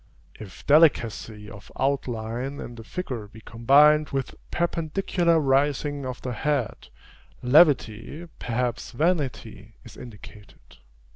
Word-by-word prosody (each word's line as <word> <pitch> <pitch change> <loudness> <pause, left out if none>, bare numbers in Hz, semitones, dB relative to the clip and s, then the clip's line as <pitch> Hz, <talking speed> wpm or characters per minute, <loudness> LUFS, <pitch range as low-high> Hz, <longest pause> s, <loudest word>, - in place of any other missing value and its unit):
If 100 -5 -12
delicacy 115 -8 +2
of 105 0 -13
outline 130 -1 -2
in 120 - -7
the 115 -1 -11
figure, 125 - -6
be 110 +2 -15
combined 145 +7 +4
with 135 -2 -3 0.2
perpendicular 170 0 0
rising 145 0 0
of 125 -1 -7
the 125 - -3
head, 135 -1 -2 0.6
levity, 140 +1 +3
perhaps 125 +1 -3
vanity, 125 - -2
is 115 - -14
indicated. 105 -4 -14
130 Hz, 110 wpm, -25 LUFS, 115-150 Hz, 0.6 s, combined